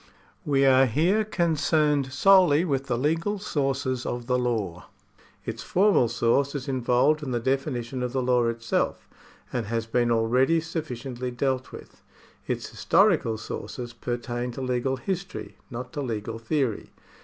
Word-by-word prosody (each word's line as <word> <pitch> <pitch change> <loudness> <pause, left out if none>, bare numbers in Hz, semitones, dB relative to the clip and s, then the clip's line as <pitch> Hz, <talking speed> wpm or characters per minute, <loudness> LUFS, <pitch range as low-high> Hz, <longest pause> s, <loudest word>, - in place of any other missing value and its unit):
We 140 -2 +3
are 130 0 +6
here 175 - +2
concerned 155 -7 +1
solely 180 -1 +5
with 135 -4 -1
the 120 -2 0
legal 165 - 0
sources 135 - -1
of 120 -1 -4
the 125 +1 +1
law. 105 -8 -2 0.6
Its - - -5
formal 190 - +3
source 125 +5 +1
is 135 -3 -4
involved 130 +3 +2
in 145 - -5
the 120 -1 0
definition 130 -1 -2
of 125 -1 -2
the 130 0 -1
law 125 -1 +2
itself, 115 -1 -1 0.5
and 120 -4 -2
has 115 0 -1
been 120 +1 +1
already 125 +7 +3
sufficiently 130 -6 -5
dealt 130 +1 -2
with. - - -12 0.5
Its - - -2
historical 170 - +2
sources 120 +2 -6
pertain 120 +1 -4
to 135 - -6
legal 130 +1 -1
history, 190 +6 -5
not 125 0 -7
to 145 - -3
legal 115 -3 -4
theory. 120 -1 -1
130 Hz, 145 wpm, -26 LUFS, 120-150 Hz, 0.6 s, are